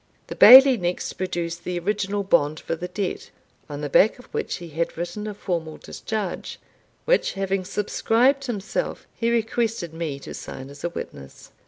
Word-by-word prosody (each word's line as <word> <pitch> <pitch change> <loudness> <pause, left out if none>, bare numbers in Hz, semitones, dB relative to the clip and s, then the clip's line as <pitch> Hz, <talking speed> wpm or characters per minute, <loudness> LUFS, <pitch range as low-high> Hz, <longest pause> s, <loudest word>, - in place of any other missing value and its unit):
The - - -7
Bailie 265 0 +10
next 175 -2 -2
produced 175 -2 -4
the 180 -1 -3
original 200 +2 -1
bond 155 -5 +2
for - - -3
the 175 +2 -5
debt, 185 +1 -4 0.4
on 145 0 -6
the 150 - -2
back 195 +9 +4
of 250 - -14
which - - -2
he 175 -2 -9
had 165 +2 -3
written 175 +5 -4
a 210 - -5
formal 165 -6 -4
discharge, 210 -5 -5 0.5
which, - - +2
having 195 -1 -1
subscribed 240 +8 +1
himself, 215 -5 -3
he 230 - -1
requested 225 -6 -1
me 160 -4 -4
to - - -8
sign 135 +1 -8
as 145 0 -13
a 175 - 0
witness. 70 - -9
185 Hz, 170 wpm, -24 LUFS, 170-215 Hz, 0.5 s, Bailie